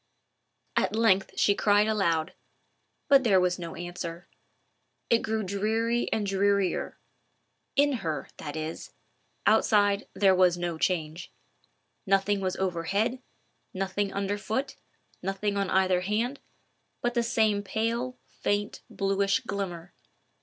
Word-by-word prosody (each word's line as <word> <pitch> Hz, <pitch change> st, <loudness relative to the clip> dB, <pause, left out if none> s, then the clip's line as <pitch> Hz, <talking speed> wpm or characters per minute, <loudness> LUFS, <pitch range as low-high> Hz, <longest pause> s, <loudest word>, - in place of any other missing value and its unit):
At -, -, +1 dB
length 200 Hz, -4 st, +2 dB
she 200 Hz, -, +4 dB
cried 205 Hz, +1 st, +3 dB
aloud; 175 Hz, -6 st, 0 dB, 0.7 s
but 275 Hz, -2 st, +6 dB
there 200 Hz, -6 st, +4 dB
was 180 Hz, 0 st, +1 dB
no 170 Hz, -1 st, -6 dB
answer. 175 Hz, 0 st, -6 dB, 0.8 s
It 230 Hz, -, +6 dB
grew 220 Hz, -1 st, -2 dB
dreary 220 Hz, +5 st, 0 dB
and 215 Hz, -2 st, 0 dB
drearier—in 200 Hz, +7 st, -1 dB
her, 155 Hz, -9 st, -3 dB
that 145 Hz, -, -6 dB
is: 155 Hz, +1 st, -5 dB, 0.5 s
outside 205 Hz, -2 st, +3 dB
there 195 Hz, -2 st, +5 dB
was 180 Hz, -1 st, +4 dB
no 175 Hz, -2 st, -3 dB
change. 165 Hz, -1 st, -1 dB, 0.8 s
Nothing 195 Hz, +1 st, +2 dB
was 185 Hz, -1 st, -1 dB
overhead, 195 Hz, +7 st, -1 dB, 0.5 s
nothing 195 Hz, +1 st, -1 dB
under 200 Hz, +1 st, -2 dB
foot, 265 Hz, +6 st, -2 dB, 0.5 s
nothing 195 Hz, +2 st, -2 dB
on 200 Hz, -2 st, 0 dB
either 185 Hz, -1 st, +3 dB
hand, 225 Hz, +8 st, -1 dB, 0.6 s
but 240 Hz, 0 st, +1 dB
the 240 Hz, -, +2 dB
same 220 Hz, -3 st, +2 dB
pale, 230 Hz, +5 st, -2 dB
faint, 205 Hz, 0 st, -2 dB
bluish 195 Hz, +3 st, +1 dB
glimmer. 185 Hz, -7 st, -5 dB
200 Hz, 120 wpm, -28 LUFS, 180-220 Hz, 0.8 s, but